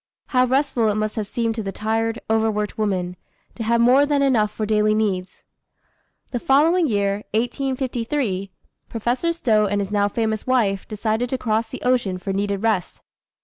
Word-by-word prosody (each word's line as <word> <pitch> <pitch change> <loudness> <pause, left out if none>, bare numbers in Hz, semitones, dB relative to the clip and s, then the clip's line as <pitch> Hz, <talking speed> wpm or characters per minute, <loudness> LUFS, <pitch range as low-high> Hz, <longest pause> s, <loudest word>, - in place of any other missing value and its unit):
How 255 -2 +3
restful 260 -4 +1
it 205 - 0
must 215 0 -2
have 215 -3 -3
seemed 230 +1 -1
to 225 - -4
the 195 -2 -4
tired, 225 +2 -1
over 220 0 +2
worked 210 -1 -2
woman, 185 -4 -2 0.4
to - - -8
have 230 +1 +2
more 250 +4 +5
than 290 -1 +2
enough 230 -6 +3
for 215 +1 -4
daily 215 0 +2
needs! 190 -4 -2 0.9
The 245 - -2
following 315 +7 +3
year, 200 -4 +1 0.2
1853, 245 -4 -1 0.4
Professor 240 +9 -1
Stowe 220 -10 +2
and 205 +1 0
his 200 0 -3
now 205 -1 +2
famous 220 +1 -2
wife 215 -7 +1
decided 220 +3 -1
to 260 - -1
cross 225 -2 -1
the - - -8
ocean 240 -7 +1
for 190 +1 -4
needed 200 +1 -1
rest. 210 -6 0
220 Hz, 175 wpm, -22 LUFS, 205-245 Hz, 0.9 s, more